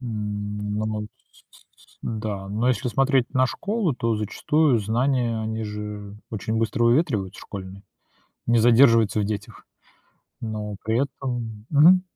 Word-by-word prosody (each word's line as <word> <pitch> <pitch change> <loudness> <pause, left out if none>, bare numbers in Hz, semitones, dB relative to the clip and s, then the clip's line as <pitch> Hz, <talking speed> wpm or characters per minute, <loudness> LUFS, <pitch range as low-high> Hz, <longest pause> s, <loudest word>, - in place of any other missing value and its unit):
М, 105 -3 -4
но 110 - -1
мон 105 -1 -3 0.2
с - - -22
с - - -23
с - - -41
да, 105 -3 -4
но 110 +5 0
если 130 +1 +1
смотреть 135 +2 +2
на 130 0 +4
школу, 200 - -1
то 115 -2 0
зачастую 130 +6 +2
знания, 115 +2 0
они 110 0 -3
же 105 -1 -6
очень 110 +1 -3
быстро 115 +1 +1
выветриваются 115 - +1
школьные, 95 -1 -8 0.6
не 120 0 +4
задерживаются 115 -2 +5
в - - +1
детях, 105 0 -5 0.7
но 105 -2 -4
при 110 +3 +1
этом 120 -6 -5
мгм. 170 +5 +7
110 Hz, 145 wpm, -24 LUFS, 105-125 Hz, 0.7 s, мгм